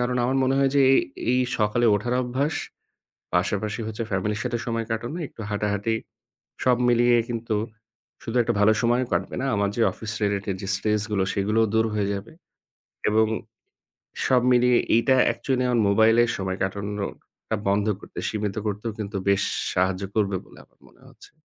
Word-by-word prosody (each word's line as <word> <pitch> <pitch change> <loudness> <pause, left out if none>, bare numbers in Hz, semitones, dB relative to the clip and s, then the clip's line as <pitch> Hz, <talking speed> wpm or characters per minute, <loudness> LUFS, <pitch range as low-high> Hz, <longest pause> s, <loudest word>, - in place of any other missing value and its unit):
কারণ 125 0 0
আমার 130 +2 +1
মনে 130 +1 +2
হয় 135 -1 +3
যে 140 - +6
এ - - +6 0.4
এই 125 - +3 0.2
সকালে 110 +2 +2
ওঠার 120 +4 -1
অভ্যাস, 130 +5 -1 0.8
পাশাপাশি 105 +5 0
হচ্ছে 110 +1 -4
family-র 105 +2 -1
সাথে 120 -1 -1
সময় 115 -1 -2
কাটানো, 120 +8 -3
একটু - - -14
হাঁটাহাঁটি 105 +1 -1 0.7
সব 125 -1 +4
মিলিয়ে 120 0 +4
কিন্তু 115 -2 -2 0.7
শুধু 115 - -5
একটা 120 - 0
ভালো 105 +1 +5
সময় 120 +2 +2
কাটবে - - -1
না, - - -1
আমার 100 0 +1
যে 120 - 0
office 110 -1 -6
related 100 -1 -1
যে 95 - -5
stress 105 +1 0
গুলো 100 -2 +1
সেগুলোও 105 +3 +2
দূর 110 0 +3
হয়ে 105 -2 0
যাবে 100 +2 -6 0.8
এবং 110 +1 +3 1.0
সব 130 -1 +4
মিলিয়ে 125 0 +4 0.2
এইটা 130 +3 +3 0.2
actually 130 -2 -1
আমার 120 -2 +2
মোবাইলে 110 +3 +5 0.2
সময় 95 -1 -2
কাটানোটা 100 +2 -4
বন্ধ 100 +1 +2
করতে, - - -11
সীমিত 105 -2 -3
করতেও 105 +2 -3
কিন্তু 105 -1 -4
বেশ 100 -1 +3 0.3
সাহায্য 95 +1 +1
করবে 100 -3 +1
বলে - - -17
আমার - - -38
মনে - - -25
হচ্ছে। - - -17
110 Hz, 165 wpm, -24 LUFS, 100-120 Hz, 1.0 s, যে